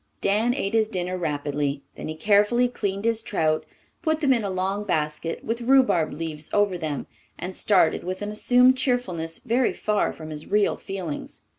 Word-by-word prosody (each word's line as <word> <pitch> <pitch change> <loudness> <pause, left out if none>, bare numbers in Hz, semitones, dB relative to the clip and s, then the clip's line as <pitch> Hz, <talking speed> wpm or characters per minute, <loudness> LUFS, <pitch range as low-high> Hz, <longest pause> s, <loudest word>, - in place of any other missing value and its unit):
Dan 220 +5 +2
ate 200 -7 -2
his 220 -1 +3
dinner 185 -3 -2
rapidly; 145 -4 -2
then - - -6
he 155 - -4
carefully 210 +7 +3
cleaned 200 -4 -3
his 230 -1 +1
trout, 155 -7 0 0.3
put 315 -2 +1
them 280 -4 +4
in 235 -3 0
a 200 - -2
long 190 +2 -1
basket, 155 -3 -2
with 230 +2 -2
rhubarb 250 -10 +4
leaves 155 -1 -6
over 205 -2 +3
them, 155 -5 -3 0.3
and 185 +1 -6
started 185 -6 +3
with 185 +3 -4
an 205 - -3
assumed 250 +4 +4
cheerfulness 185 -12 -1
very 245 0 +1
far 210 -1 0
from 155 -1 -9
his 150 0 -7
real 205 0 +3
feelings. 185 -6 -6
195 Hz, 175 wpm, -25 LUFS, 160-230 Hz, 0.3 s, them